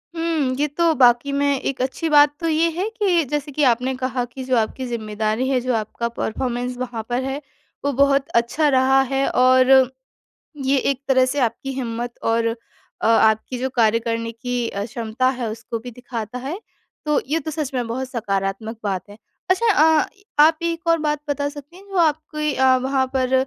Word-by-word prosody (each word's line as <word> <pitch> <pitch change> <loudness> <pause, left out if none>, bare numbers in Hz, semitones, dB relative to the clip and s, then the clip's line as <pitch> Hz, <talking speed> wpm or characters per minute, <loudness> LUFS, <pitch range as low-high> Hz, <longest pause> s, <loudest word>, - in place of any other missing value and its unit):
हुँ, 325 -6 0
ये 295 - +2
तो 330 +3 +1
वाकई 245 +2 +4
में 280 -1 +1
एक 275 - -3
अच्छी 265 +6 -2
बात 290 -1 +6
तो 335 - -2
ये 325 +1 +2
है 390 +4 -1
कि 400 -7 +1
जैसे 295 0 -2
कि 295 +2 0
आपने 250 +3 -1
कहा 255 -1 -2
कि 250 +2 -9
जो 255 0 0
आपकी 230 +4 -1
ज़िम्मेदारी 220 +1 -2
है, 265 -2 +2
जो 255 +1 -1
आपका 220 +2 -3
परफ़ॉर्मेंस 245 +2 -3
वहाँ 245 -3 -4
पर 245 +2 -1
है, 270 +2 -3 0.4
वो 285 - +2
बहुत 280 +1 +2
अच्छा 235 +6 +2
रहा 265 0 +4
है 270 0 +1
और 255 +1 +5 0.7
ये 275 +1 +3
एक 270 -1 -5
तरह 260 -1 +4
से 275 +3 -2
आपकी 245 +2 -1
हिम्मत 240 -2 -4
और 230 0 +1
अ, 230 -1 -6
आपकी 220 +2 +3
जो 260 +1 -1
कार्य 230 -1 +3
करने 230 0 -3
की 240 +1 -3
अ, 200 +1 -4
क्षमता 230 +2 -1
है, 250 -3 -3
उसको 225 +1 -5
भी 245 +2 -9
दिखाता 240 -1 -6
है, 275 +9 -5 0.5
तो 300 -1 +2
ये 310 +4 0
तो 315 +1 -5
सच 300 -3 -4
में 250 -2 -1
बहुत 255 +3 -3
सकारात्मक 215 -1 -3
बात 195 -3 -2
है। 205 - -12 0.3
अच्छा 435 +5 +3 0.3
अ, - - 0 0.4
आप 315 +1 +5
एक 335 0 -3
और 330 0 +4
बात 300 -1 -1
बता 285 0 0
सकती 290 +3 -12
हैं, 385 - -15
जो 390 - -4
आपकी 305 -2 0
अ, 260 0 +4
वहाँ 265 0 +1
पर 260 -1 0
260 Hz, 195 wpm, -21 LUFS, 235-290 Hz, 0.7 s, बात